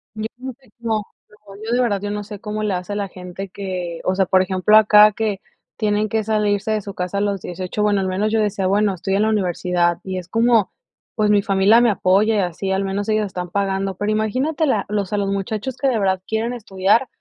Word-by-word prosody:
Yo 215 Hz, 0 st, -3 dB
no 260 Hz, +1 st, -6 dB
sé 265 Hz, -, -24 dB
cómo, 220 Hz, -3 st, -2 dB, 0.4 s
no, 195 Hz, -, -11 dB
yo 225 Hz, -, -3 dB
de 250 Hz, -, +3 dB
verdad 210 Hz, -5 st, +1 dB
yo 205 Hz, 0 st, -3 dB
no 210 Hz, 0 st, -3 dB
sé 205 Hz, 0 st, -9 dB
cómo 210 Hz, +1 st, -4 dB
le 210 Hz, -3 st, 0 dB
hace 180 Hz, +3 st, -5 dB
a -, -, -3 dB
la 205 Hz, -1 st, -2 dB
gente 185 Hz, +1 st, -8 dB
que, 180 Hz, -3 st, -5 dB
o 185 Hz, -, +1 dB
sea, 190 Hz, 0 st, +1 dB
por 185 Hz, 0 st, +4 dB
ejemplo, 190 Hz, +3 st, +4 dB
acá, 210 Hz, 0 st, +7 dB
que 210 Hz, -2 st, -2 dB, 0.3 s
tienen 210 Hz, -1 st, 0 dB
que 220 Hz, +1 st, -1 dB
salirse 210 Hz, -1 st, 0 dB
de 215 Hz, -1 st, 0 dB
su 200 Hz, 0 st, -8 dB
casa 180 Hz, +2 st, -3 dB
los 200 Hz, -2 st, -1 dB
18. 185 Hz, +3 st, -4 dB
Bueno, 205 Hz, -1 st, +2 dB
al 190 Hz, -, -1 dB
menos 200 Hz, +3 st, -1 dB
yo 225 Hz, -, +2 dB
decía: 200 Hz, -3 st, 0 dB
"Bueno, 200 Hz, +1 st, +2 dB
estoy 190 Hz, +2 st, -2 dB
en 205 Hz, -, +2 dB
la 220 Hz, -, +2 dB
universidad. 180 Hz, -4 st, 0 dB
Y 190 Hz, -1 st, -4 dB
es 175 Hz, -, -10 dB
como, 225 Hz, 0 st, +2 dB, 0.4 s
pues, 210 Hz, -2 st, +2 dB
mi 205 Hz, -1 st, +4 dB
familia 200 Hz, +4 st, +4 dB
me 240 Hz, -, +4 dB
apoya 205 Hz, +2 st, +2 dB
y -, -, +2 dB
así, 185 Hz, +1 st, -2 dB
al 190 Hz, +1 st, 0 dB
menos 200 Hz, +2 st, -3 dB
ellos 215 Hz, 0 st, +1 dB
están 180 Hz, -2 st, -5 dB
pagando", 195 Hz, 0 st, -1 dB
pero, 205 Hz, +3 st, -2 dB
imagínate 255 Hz, +9 st, 0 dB
la 220 Hz, -7 st, +1 dB
o 205 Hz, -1 st, 0 dB
sea, 205 Hz, +3 st, -3 dB
los 200 Hz, -1 st, -1 dB
muchachos 210 Hz, +6 st, -3 dB
que 275 Hz, -, 0 dB
de 255 Hz, -4 st, +2 dB
verdad 190 Hz, -3 st, 0 dB
quieren 225 Hz, +2 st, -1 dB
estudiar, 210 Hz, +1 st, +1 dB
205 Hz, 240 wpm, -20 LUFS, 190-215 Hz, 0.4 s, acá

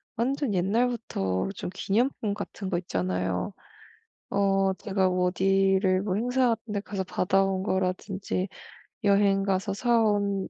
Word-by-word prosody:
완전 260 Hz, 0 st, 0 dB
옛날부터 195 Hz, -, 0 dB
좀 180 Hz, -, -5 dB
기념품 215 Hz, +1 st, 0 dB
같은 200 Hz, -1 st, -6 dB
거 175 Hz, -, 0 dB
있잖아요. 95 Hz, -, -2 dB, 0.8 s
어 195 Hz, -1 st, +2 dB
제가 190 Hz, -2 st, 0 dB
어디를 190 Hz, +1 st, +2 dB
뭐 190 Hz, -2 st, -1 dB
행사 250 Hz, +4 st, +2 dB
같은 225 Hz, 0 st, -12 dB
데 205 Hz, -, 0 dB
가서 200 Hz, -2 st, -4 dB
받아 190 Hz, +1 st, +1 dB
온 190 Hz, -1 st, -1 dB
거라든지 190 Hz, 0 st, -1 dB, 0.6 s
여행 200 Hz, -1 st, +4 dB
가서 195 Hz, +1 st, 0 dB
사 235 Hz, +3 st, +2 dB
온 200 Hz, -2 st, 0 dB
195 Hz, 250 characters per minute, -27 LUFS, 185-210 Hz, 0.8 s, 여행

